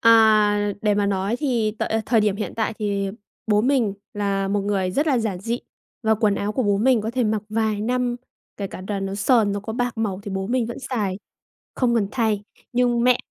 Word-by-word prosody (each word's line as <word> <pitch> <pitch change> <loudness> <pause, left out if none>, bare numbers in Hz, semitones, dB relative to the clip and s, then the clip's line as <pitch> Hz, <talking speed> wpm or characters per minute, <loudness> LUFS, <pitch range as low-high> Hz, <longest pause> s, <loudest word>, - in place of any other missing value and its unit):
À, 215 -2 +5
để 210 -1 +3
mà 205 0 +1
nói 195 +3 0
thì 240 -7 +1
tợi - - -1 0.2
thời 230 -3 +4
điểm 210 -2 +1
hiện 210 - -4
tại 220 -1 -1
thì 200 -2 -1 0.4
bố 210 -1 +3
mình 245 -5 +2 0.2
là 195 -1 0
một 205 +1 +1
người 195 -2 0
rất 290 - 0
là 270 -5 +3
giản 215 -5 -2
dị, 235 +4 -2 0.4
và 220 -1 +3
quần 215 -2 +2
áo 200 +1 -2
của 255 - 0
bố 205 -3 +2
mình 250 +1 +4
có 220 +2 -3
thể 250 -1 0
mặc 215 -1 0
vài 215 -1 0
năm, 245 +2 0 0.4
kể 200 - -3
cả 185 - -8
là 200 -1 -1
nó 195 0 -3
sờn, 210 0 +3
nó 200 - -2
có 220 +2 -5
bạc 245 0 -2
màu 200 -3 -1
thì 205 - -6
bố 190 0 -2
mình 240 +1 0
vẫn 235 - -6
xài, 210 -8 -2 0.6
không 240 -2 +2
cần 205 -3 +2
thay. 220 -5 +1 0.3
Nhưng 240 -1 +2
mẹ 250 0 +5
215 Hz, 225 wpm, -23 LUFS, 200-235 Hz, 0.6 s, À